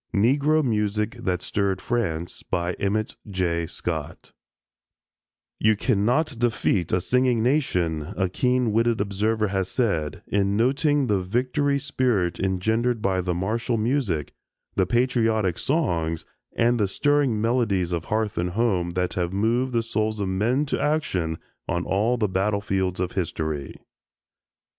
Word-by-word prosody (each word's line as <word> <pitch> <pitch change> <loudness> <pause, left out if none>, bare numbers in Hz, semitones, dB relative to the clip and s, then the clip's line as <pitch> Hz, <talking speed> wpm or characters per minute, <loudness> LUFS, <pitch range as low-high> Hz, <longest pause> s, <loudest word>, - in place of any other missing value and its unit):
NEGRO 140 +8 +3
MUSIC 105 -1 0
THAT 90 -6 -2
STIRRED 100 -2 0
FRANCE 90 -9 -2
EMMETT 95 +4 -1
J. 85 -3 -1
SCOTT 80 -3 -5 1.3
"You 110 0 +4
cannot 120 +8 +1
defeat 105 -7 +1
a 90 - +3
singing 125 +3 +2
nation," 90 - 0
a 95 - +2
keen 125 +4 +1
witted 115 +1 +2
observer 105 +2 0
has 95 -1 -1
said, 95 - -1
in 100 0 +1
noting 140 +4 +2
the 105 -5 +1
victory 130 +8 0
spirit 125 - 0
engendered 110 +5 0
by 95 -1 +1
the 90 -1 -1
martial 115 +6 -1
music, 110 - -1 0.4
the 95 -2 +1
patriotic 115 -6 +1
songs 85 - 0 0.3
and 120 +1 +2
the 105 - +2
stirring 145 +1 +1
melodies 110 -6 +1
of 85 -2 -2
hearth 110 -2 -1
and 90 +1 0
home 95 -7 +1
that 90 0 0
have 90 -1 -1
moved 115 +6 +1
the 115 -1 +1
souls 110 -1 -1
of 100 - -1
men 115 +10 +1
to 145 - -2
action 95 - 0 0.3
on 85 +1 -1
all 110 +6 +1
the 110 -3 +1
battlefields 95 -1 0
of 90 -1 -1
history. 80 -6 -3
105 Hz, 135 wpm, -24 LUFS, 90-120 Hz, 1.3 s, You